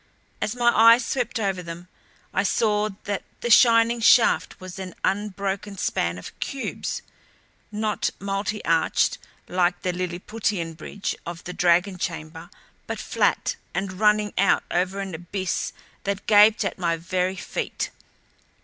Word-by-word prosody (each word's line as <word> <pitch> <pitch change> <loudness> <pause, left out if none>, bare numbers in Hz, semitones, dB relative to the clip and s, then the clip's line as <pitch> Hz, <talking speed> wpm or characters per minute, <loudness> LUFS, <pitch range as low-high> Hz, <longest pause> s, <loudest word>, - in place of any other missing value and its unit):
As 215 - -1
my 240 -1 +4
eyes 230 +2 +7
swept 250 -2 -1
over 195 -3 -1
them, 170 +1 -8 0.5
I - - +2
saw 210 -1 +1
that 205 -2 -2 0.2
the 240 - -1
shining 230 0 +6
shaft 230 +1 +4
was 185 0 -9
an 185 -2 -7
unbroken 200 0 -2
span 85 - -1
of 90 - -10
cubes; 275 -1 -4 0.7
not 215 0 -1
multi 200 +2 -3
arched 165 -1 +2 0.3
like 180 0 +1
the 180 - 0
Lilliputian 180 0 -3
bridge 175 +5 -5
of 170 0 -7
the 180 - -6
dragon 180 +2 +2
chamber, 160 -2 -5 0.4
but - - -3
flat - - 0 0.2
and 190 0 -3
running 210 -1 +3
out 195 - +4
over 185 +3 0
an 195 -2 -5
abyss 175 +3 -3 0.3
that 200 0 -2
gaped 210 +1 +6
at - - -3
my 170 -2 +1
very 185 +2 -1
feet. - - -4
195 Hz, 140 wpm, -24 LUFS, 180-210 Hz, 0.7 s, eyes